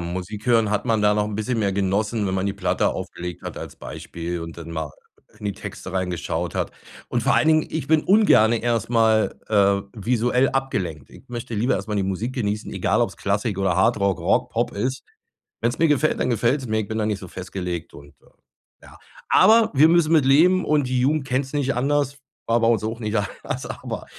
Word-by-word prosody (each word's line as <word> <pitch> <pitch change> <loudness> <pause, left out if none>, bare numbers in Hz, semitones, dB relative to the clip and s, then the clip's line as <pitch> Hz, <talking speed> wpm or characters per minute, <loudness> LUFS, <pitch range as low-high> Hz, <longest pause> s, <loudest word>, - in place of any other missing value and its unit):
Musik 95 +6 -6
hören 115 -3 +3
hat 105 +2 0
man 110 -3 +1
da 105 0 +4
noch 105 0 +1
'n 105 - -5
bisschen 110 +3 -2
mehr 100 -2 +1
genossen, 100 +3 0
wenn 95 - -1
man 95 +1 -1
die 100 - -1
Platte 100 -2 0
aufgelegt 90 -1 -6
hat - - -6
als - - -8
Beispiel 85 +1 -6
und 80 0 -8
dann 85 -1 -9
mal 80 -2 -4 0.5
in 105 - -11
die 100 - -1
Texte 90 - -8
reingeschaut 90 -2 -2
hat. - - -2 0.4
Und - - -1
vor - - +3
allen - - +3
Dingen 155 -1 +3
ich 155 -4 -3
bin 155 -1 +3
ungerne 185 - +5
erst 120 -3 0
mal, 110 -2 +2
äh, 100 -2 +3
visuell 120 +4 +1
abgelenkt. 95 - -3
Ich - - -15
möchte 120 -1 -6
lieber 115 +5 +1
erst 100 +3 -4
mal 105 - -2
die 100 - +1
Musik 95 +6 -2
genießen, 105 -4 -2
egal - - +1
ob's - - -3
Klassik 100 0 -1
oder 95 -3 +1
Hardrock, 100 0 +2
Rock, - - +1
Pop - - -1
ist. 125 +6 -3 0.6
Wenn's 120 +1 -1
mir 165 - +4
gefällt, 150 +1 +1
dann - - 0
gefällt's 120 +4 +1
mir. 110 0 0
Ich 105 - -3
bin 110 - -4
da 110 - 0
nicht 105 -2 -1
so 95 - -9
festgelegt 90 -1 -6
und, 70 0 -13
äh, - - -26 0.6
ja. - - -15 0.3
Aber 225 +1 +5
wir 150 +4 +6
müssen 165 -1 +3
mit 155 -5 +4
leben 175 +7 +4
und 150 -4 +2
die 125 0 0
Jugend 145 +2 +1
kennt's 130 +1 -2
nicht 140 -2 0
anders, 140 +2 0 0.3
war 115 +1 +2
bei 115 - +2
uns 115 -2 +2
auch 115 +2 -3
nicht 105 -1 -3
anders. 100 -3 -3
Aber - - -6
110 Hz, 215 wpm, -23 LUFS, 100-130 Hz, 0.6 s, wir